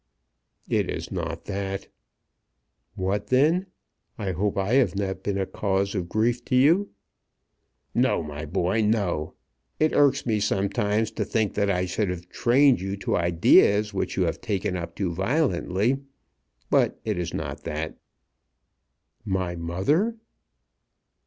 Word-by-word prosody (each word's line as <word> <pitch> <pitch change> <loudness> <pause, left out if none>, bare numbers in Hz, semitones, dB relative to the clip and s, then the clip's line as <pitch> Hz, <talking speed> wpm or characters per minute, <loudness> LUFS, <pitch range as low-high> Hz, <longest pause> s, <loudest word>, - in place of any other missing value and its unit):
"It - - 0
is - - -4
not - - -4
that." 95 -1 -4 1.1
"What 95 +2 -1
then? 155 +9 +3 0.5
I 100 -4 -2
hope 100 +4 -1
I 100 +4 0
have 130 -6 +3
not 95 -1 -2
been 100 -1 -2
a 95 - 0
cause 100 0 -1
of 90 -4 -3
grief 120 +4 +1
to - - 0
you?" 165 +10 +4 1.0
"No, - - +2
my 75 0 -6
boy; 90 +6 0
no. 100 -8 0 0.4
It 155 0 +2
irks 140 -1 +3
me 110 -3 +1
sometimes 105 +2 0
to - - -2
think 110 -3 0
that 100 -1 +1
I 90 -1 +1
should 95 +2 -1
have 90 -1 -5
trained 130 +1 +4
you 95 +1 -3
to - - -1
ideas 100 +5 +4
which 95 - -2
you 95 - +3
have 85 -2 -2
taken 100 -2 -1
up 85 -2 -5
too 95 -4 -2
violently. 105 - +1 0.7
But - - +2
it 105 -5 -1
is 85 -1 -3
not - - -5
that." 80 +1 -4 1.2
"My 95 -4 -2
mother 95 - 0
100 Hz, 140 wpm, -25 LUFS, 90-115 Hz, 1.2 s, you